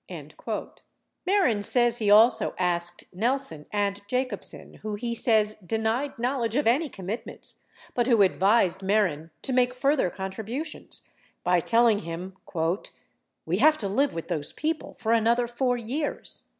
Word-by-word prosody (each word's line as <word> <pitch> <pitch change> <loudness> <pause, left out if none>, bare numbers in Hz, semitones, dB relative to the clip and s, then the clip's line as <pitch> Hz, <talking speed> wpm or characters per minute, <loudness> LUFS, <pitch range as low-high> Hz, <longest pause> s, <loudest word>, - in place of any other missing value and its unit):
52 - - -6 0.6
Mehren 360 - +2
says 240 +2 +5
he 210 -2 +1
also 220 +4 +5
asked 175 -1 -1
Nelson 220 - -2
and 205 -1 -1
Jacobsen 250 -3 -3
who 215 -1 -4
he 235 +3 -3
says 215 -2 +2
denied 225 +8 -1
knowledge 240 -2 -1
of 290 - +1
any 275 +7 +2
commitments 195 +3 -7 0.3
but 240 -1 +1
who 230 -5 +5
advised 190 -1 +3
Mehren 190 -6 +1
to 265 - -2
make 250 0 +2
further 275 -5 +2
con 190 +1 -5
tributions, 240 +10 -5 0.4
by 180 0 +3
telling 230 +3 +3
him: 180 +1 -7 1.1
"We 170 +3 0
have 305 +7 +5
to 205 - -3
live 270 +9 +2
w 165 - -5
T - - -24
ith - - -21
those 155 -5 -2
people 315 0 -3
for 225 -1 -2
another 230 +2 +3
4 245 +1 0
years." 265 +6 -3
225 Hz, 150 wpm, -26 LUFS, 195-250 Hz, 1.1 s, says